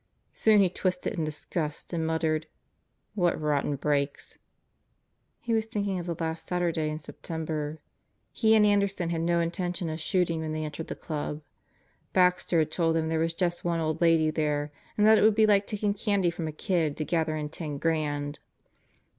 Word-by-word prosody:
Soon 215 -2 +5
he 190 - +5
twisted 185 +3 -1
in 170 -6 -2
disgust 155 +1 -4
and 165 -1 0
muttered: 160 -1 0 0.7
"What 175 -5 +1
rotten 145 -1 0
breaks!" 140 0 -2 1.0
He 235 - -2
was 220 0 +1
thinking 200 -3 -2
of 175 - -6
the 170 - -2
last 160 0 -3
Saturday 170 -3 0
in 155 - -3
September. 155 -1 -5 0.5
He 220 -1 +3
and 215 -1 +6
Anderson 200 -4 +1
had 165 -1 -1
no 170 +1 +2
intention 175 0 -2
of 155 - -4
shooting 170 -1 0
when 155 -1 -3
they 155 0 -2
entered 155 +1 -6
the - - -5
Club. 150 -1 -4 0.7
Baxter 180 -1 +3
had 155 -1 +2
told 165 -1 +1
them 160 -1 0
there 160 0 0
was 165 +1 0
just 175 -1 -1
one 170 -1 0
old 155 0 -1
lady 165 -2 +4
there 150 -1 -1 0.3
and 210 - +4
that 220 0 +7
it - - +2
would 215 -1 +5
be 220 0 +5
like 200 -1 +3
taking 210 -1 -1
candy 200 -4 +1
from 165 -1 -4
a - - -3
kid 155 -1 -1
to 155 - -2
gather 160 0 0
in 150 -1 -3
ten 150 -2 -5
grand. 145 -2 -1
165 Hz, 185 wpm, -28 LUFS, 155-180 Hz, 1.0 s, that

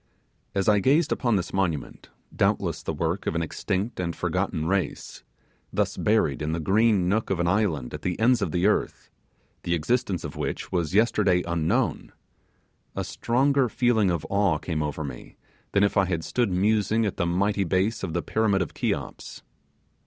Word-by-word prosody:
As 95 -1 0
I 105 -1 +5
gazed 145 - +3
upon 120 -4 +1
this 90 -2 -2
monument, 90 -6 -2 0.3
doubtless - - 0
the - - -3
work 80 +4 -2
of - - -1
an 85 - 0
extinct 95 +7 -3
and 85 -2 -2
forgotten 80 - -1
race, 95 +2 -2 0.5
thus - - 0
buried - - +1
in 75 +1 -1
the 85 - -1
green 100 +2 +3
nook 110 +4 0
of 95 - 0
an 85 - +1
island 90 - 0
at - - -6
the 90 +1 -2
ends 120 +1 +3
of 95 -6 -1
the 90 +2 0
earth, 105 - 0 0.5
the 85 - 0
existence 95 +1 -1
of - - -6
which - - -4
was 85 -1 -1
yesterday 100 -5 +3
unknown, 85 -2 0 0.8
a - - -2
stronger 135 +1 +1
feeling 110 -3 +2
of 85 -4 -1
awe 100 -5 +2
came 80 0 -3
over 75 +1 -3
me 65 -4 -9 0.4
than 100 - +4
if 100 - +1
I 100 - +4
had 85 -3 -2
stood 120 +3 0
musing 105 +3 +2
at 100 - -3
the 85 - 0
mighty 100 +3 +1
base 95 +5 0
of 80 - -4
the 85 - -1
Pyramid 105 -4 +1
of - - -9
Cheops. - - -4
95 Hz, 180 wpm, -25 LUFS, 85-110 Hz, 0.8 s, I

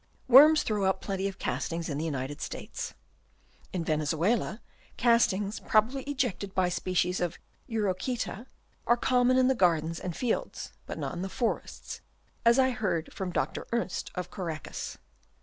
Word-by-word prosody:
Worms 295 +5 +8
throw 210 -3 0
up 190 0 +2
plenty 195 -1 -2
of 195 - -6
castings 165 0 -2
in 145 -2 -3
the 160 - -2
United 140 -2 -3
States. - - -5 0.8
In 180 -3 -2
Venezuela, 160 +9 +1 0.4
castings, 225 -4 +3
probably 230 +5 +2
ejected 245 -8 -2
by 185 -1 +3
species 180 0 0
of 175 -1 -2 0.3
Urochseta, 220 +2 -2 0.4
are 240 - +5
common 250 +1 +3
in 255 0 +5
the 265 - +4
gardens 165 -6 +2
and 180 -3 -4
fields, 245 -3 -2
but - - -5
not - - -3
in 175 - -4
the 190 - -3
forests, 235 +3 -3 0.4
as 235 +1 +6
I 260 -1 +4
hear 185 -9 -1
from 190 -2 -4
Dr. - - -2
Ernst 230 -5 -1
of 180 -1 -4
Caracas. 165 -6 -5
195 Hz, 150 wpm, -29 LUFS, 175-240 Hz, 0.8 s, Worms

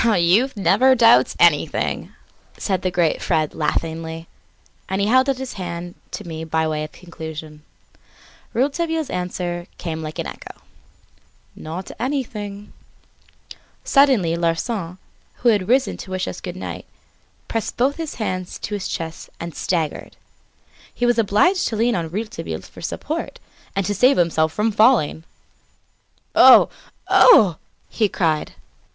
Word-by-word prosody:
"Youth 215 +4 +3
never 260 +6 +4
doubts 230 -1 +5
anything," - - +2 0.5
said 190 -3 -1
the 185 - 0
great 175 -3 +1
Fred 155 -1 0
laughingly, 160 +1 -3 0.6
and 190 +1 -1
held 255 +7 +3
out 270 - 0
his 265 -1 -6
hand 175 0 -5 0.2
to 210 - -7
me 160 -1 -6
by 160 0 0
way 155 -1 -2
of 155 - -7
conclusion. 160 -3 -9 0.9
Rouletabille's 320 +5 -1
answer 175 -1 -3
came 160 -2 -5
like 155 0 -6
an - - -3
echo: - - -9 1.0
"Not 165 +4 -7
anything!" 215 -6 -4 1.1
Suddenly 255 - +3
Larsan, 170 +2 -2 0.4
who 245 - +2
had 205 -5 +2
risen 260 +2 +2
to - - -9
wish 185 0 -2
us - - -6
goodnight, - - -7 0.6
pressed 225 -1 -3
both 265 +4 +1
his 325 -2 -5
hands 185 -5 -4
to 210 - -6
his 205 -2 -3
chest 165 0 -6
and 170 -1 -6
staggered. 165 -4 -3 0.7
He 245 - -2
was 240 -1 +2
obliged 230 - +3
to 225 - -3
lean 230 +3 +2
on 165 -3 -2
Rouletabille 215 +5 -5
for - - -14
support, 320 +2 -4 0.4
and 195 -1 0
to 205 - 0
save 250 +7 +4
himself 160 -2 +2
from 215 +5 0
falling. 215 - +3 1.1
"Oh! - - +8 0.4
Oh!" 205 - +6 0.3
he 215 -3 0
cried. 160 -5 -1
190 Hz, 135 wpm, -21 LUFS, 165-235 Hz, 1.1 s, Oh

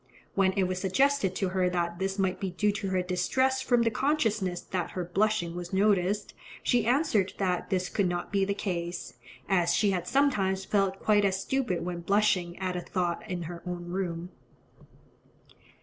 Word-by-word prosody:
When 190 -1 +3
it 195 - +1
was 185 0 -2
suggested 230 +1 +2
to 190 -1 0
her 185 -1 +1
that 175 -1 -2
this 190 +1 -1
might 190 -2 0
be 195 - -2
due 205 +4 +1
to 200 -1 -3
her 185 -1 +1
distress 260 +9 +1
from 240 -2 +3
the 230 - +2
consciousness 215 - 0
that 180 -1 -3
her 180 - -1
blushing 180 -2 0
was 175 0 -6
noticed, 200 0 +2 0.3
she 240 -3 +2
answered 235 - +2
that 180 -3 -1
this 185 -1 0
could 195 -4 0
not 175 0 -3
be 200 -1 +2
the 200 +1 0
case, 175 -3 -4 0.3
"as 175 -3 +2
she 205 -2 +3
had 180 -2 -2
sometimes 195 -9 +2
felt 195 -2 +1
quite 210 -1 +3
as 190 -1 +1
stupid 225 -7 -1
when 175 -1 -3
blushing 185 -2 +1
at 185 -1 -2
a 180 - -2
thought 175 -2 -2
in 180 -2 -3
her 170 +1 -7
own 175 -1 -5
room." 175 -2 -3
190 Hz, 180 wpm, -28 LUFS, 180-205 Hz, 0.3 s, When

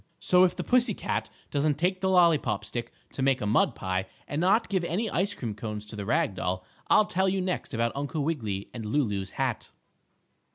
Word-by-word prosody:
So 180 0 +5
if 180 -1 +3
the - - -3
pussy 245 -4 +3
cat - - -2 0.2
doesn't 145 0 +1
take 185 +3 0
the 190 - +1
lollypop 155 - +3
stick 120 +1 -5 0.2
to - - -5
make 135 -1 +3
a 105 - -3
mud 105 +2 +3
pie, 95 0 -2 0.2
and 145 +2 -2
not 200 +6 +3
give 190 -3 0
any 195 +6 -1
ice 200 +3 0
cream 115 -4 -4
cones 105 0 -6
to 105 - -10
the 100 -1 -5
rag 110 - +2
doll, 90 0 -3 0.2
I'll 215 - +6
tell 190 0 +1
you 190 +1 0
next 185 -1 -2
about 115 0 0
Uncle 145 +2 -2
Wiggily 110 -11 -2
and 115 - -6
Lulu's 105 -5 -1
hat. 130 -4 -1
140 Hz, 205 wpm, -28 LUFS, -, 0.2 s, I'll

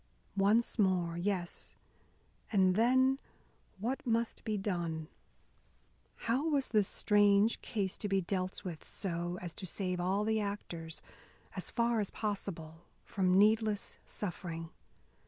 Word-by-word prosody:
Once 210 +4 +3
more! 180 -4 +2
Yes, 175 -1 -2 0.8
and 190 -3 +5
then 260 +4 +4 0.6
what 240 +7 -2
must 230 -2 0
be 215 -1 -1
done? 170 -5 -2 1.2
How 260 +8 +2
was 280 -3 +1
this 210 -3 +3
strange 205 +1 +4
case 200 -4 -2
to 205 - -2
be 195 0 +3
dealt 185 0 -2
with 170 -4 -6
so 175 -2 -3
as 170 -2 -5
to 185 - -6
save 180 0 -2
all 190 +4 +1
the 220 0 +2
actors, 175 -6 -5 0.5
as - - -3
far 235 -1 +2
as 205 - 0
possible, 175 -6 -4 0.2
from 185 -1 +2
needless 215 0 +3
suffering? 170 -4 -5
200 Hz, 125 wpm, -33 LUFS, 180-220 Hz, 1.2 s, and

